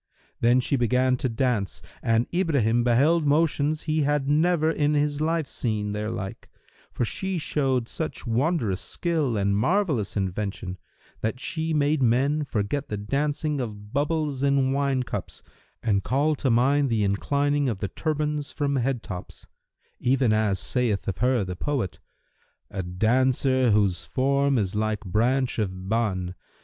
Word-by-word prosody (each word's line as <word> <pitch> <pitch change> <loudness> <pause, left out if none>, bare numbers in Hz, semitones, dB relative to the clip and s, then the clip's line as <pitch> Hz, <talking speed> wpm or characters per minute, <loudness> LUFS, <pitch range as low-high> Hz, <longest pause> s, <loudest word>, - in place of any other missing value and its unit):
Then 120 +2 +4
she 140 - +1
began 125 +1 +2
to 130 - -1
dance, 115 -5 -1 0.2
and 115 +1 +2
Ibrahim 135 - +2
beheld 140 +8 +3
motions 150 0 +2
he 155 -1 0
had 145 -1 +1
never 160 +2 +3
in 150 -1 +1
his 145 0 0
life 160 0 +1
seen 105 -6 -2
their 105 +1 -3
like, 95 -3 -6 0.4
for 120 - -1
she 190 +8 -3
showed 135 -6 0
such 160 0 -5
wondrous 115 - 0
skill 155 -9 -1
and 100 0 +1
marvellous 135 - +1
invention, 95 -1 -3 0.4
that 110 +3 -2
she 160 +2 -2
made 150 -1 +2
men 135 +5 +2
forget 135 +5 -2
the 105 - -2
dancing 145 +6 -1
of 105 -3 -7
bubbles 145 -1 0
in 140 -1 +2
wine 135 -2 +1
cups - - -6 0.4
and 100 -4 +1
called 145 +3 +1
to 135 - +1
mind 135 +4 +3
the 110 -3 +1
inclining 140 +8 +1
of 110 - -2
the 100 - -3
turbands 150 - -2
from 140 -1 -1
head[FN#326] 125 -1 0
tops: 90 -2 -8 0.5
even 125 -3 +2
as 110 -3 +1
saith 120 -6 -1
of 95 - -2
her 125 -2 +2
the 90 -1 -5
poet[FN#327], 130 -3 -2 0.7
"A 100 - -3
dancer 125 +7 +2
whose 100 -5 +2
form 140 +1 +1
is 100 -4 0
like 110 0 -1
branch 120 +6 +1
of 95 -3 -3
Ban! 95 -5 -1
130 Hz, 150 wpm, -25 LUFS, 105-145 Hz, 0.7 s, Then